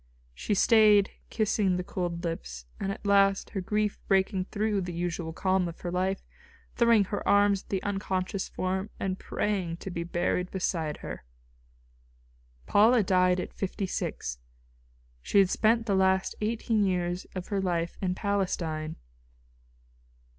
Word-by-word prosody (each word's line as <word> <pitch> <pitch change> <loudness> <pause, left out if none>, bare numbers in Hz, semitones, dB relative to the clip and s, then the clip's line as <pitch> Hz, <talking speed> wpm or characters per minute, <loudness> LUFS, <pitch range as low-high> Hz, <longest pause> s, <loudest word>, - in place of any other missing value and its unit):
She 205 - -2
stayed 210 -1 +5 0.2
kissing 210 -4 +1
the 180 - -2
cold 175 -2 -3
lips, 60 - -5
and 195 - -2
at 200 - -8
last, 195 -1 +3
her 195 - -3
grief 210 +2 -1
breaking 190 -1 +2
through 210 0 -1
the 180 -1 -5
usual 170 -1 -3
calm 185 +1 +1
of 170 - -9
her 175 - -3
life, 185 +2 -1 0.5
throwing 235 -3 +5
her 200 +1 -3
arms 200 -1 +4
about - - -27
the 190 -2 -2
unconscious 195 -1 -2
form 190 +2 -2
and 190 -1 -2
praying 185 -5 -2
to 190 - -7
be 170 -1 -3
buried 175 +1 -1
beside 165 -5 -2
her. - - -6 1.4
Paula 225 +2 +5
died 185 -1 +3
at - - -5
fifty 195 0 -3
six. - - -4 0.8
She - - 0
had 195 -2 +5
spent 225 +1 +2
the 205 - 0
last 190 0 +2
eighteen 220 0 +1
years 180 -2 -1
of 185 -1 -5
her 200 -2 0
life 175 -2 -1
in 180 -2 0
Palestine. 170 -6 -2
190 Hz, 145 wpm, -28 LUFS, 180-205 Hz, 1.4 s, stayed